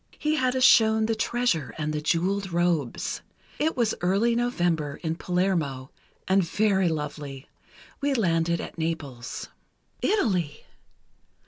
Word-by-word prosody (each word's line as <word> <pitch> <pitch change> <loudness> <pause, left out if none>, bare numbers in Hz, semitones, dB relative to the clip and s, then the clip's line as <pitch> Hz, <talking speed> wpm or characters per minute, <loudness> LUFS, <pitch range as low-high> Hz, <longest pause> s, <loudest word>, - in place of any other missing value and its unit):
He 305 +1 0
had 260 -4 +1
us 260 - +1
shown 220 -3 +6
the 225 - +1
treasure, 220 - 0
and 155 -1 -2
the 150 - -2
jeweled 185 +5 0
robes. 170 -6 0 0.4
It 315 -1 0
was 230 -3 +2
early 200 +7 +2
November 175 - 0
in 160 -1 0
Palermo, 165 -8 -1 0.4
and 190 0 +4
very 190 0 +2
lovely. 150 -3 -5 0.5
We 280 -1 +1
landed 170 -6 +1
at - - -7
Naples." 145 -7 -4 0.5
Italy! 190 - 0
175 Hz, 125 wpm, -26 LUFS, 155-220 Hz, 0.5 s, shown